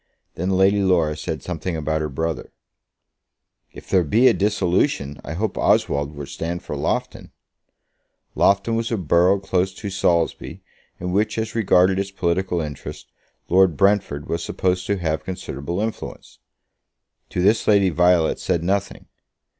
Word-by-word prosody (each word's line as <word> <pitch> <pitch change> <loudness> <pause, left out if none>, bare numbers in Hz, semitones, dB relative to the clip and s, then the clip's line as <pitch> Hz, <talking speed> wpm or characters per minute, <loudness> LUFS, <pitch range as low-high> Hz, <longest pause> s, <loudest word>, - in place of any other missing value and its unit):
Then 90 +3 -3
Lady 95 +2 +3
Laura 85 -5 +2
said 75 +1 -5
something 85 0 -4
about 80 0 -1
her 75 - -2
brother. 80 +3 -3 1.2
"If - - -13
there 95 -2 +3
be 115 - +4
a 125 - +6
dissolution, 95 - 0
I 80 - -6
hope 105 +4 -2
Oswald 70 +1 +1
will 70 0 -6
stand 85 +5 -5
for - - -5
Loughton." - - -3 1.0
Loughton 100 +3 +2
was 115 +1 -2
a 115 - 0
borough 90 +2 +3
close 95 -1 0
to 100 0 -6
Saulsby, 85 -3 -1 0.4
in 90 +1 -3
which, 105 +4 0
as 110 0 -2
regarded 95 -4 +3
its 100 0 -2
political 90 -1 -1
interests, 75 -3 -8 0.4
Lord 90 -3 +4
Brentford 100 -7 +1
was 85 0 -2
supposed 90 0 -1
to 100 - 0
have 80 -3 -2
considerable 85 -2 -5
influence. 110 +1 -6 0.9
To 90 - -2
this 105 +4 +3
Violet 90 -4 +3
said 85 - -1
nothing. 100 +2 -2
90 Hz, 145 wpm, -22 LUFS, 80-100 Hz, 1.2 s, a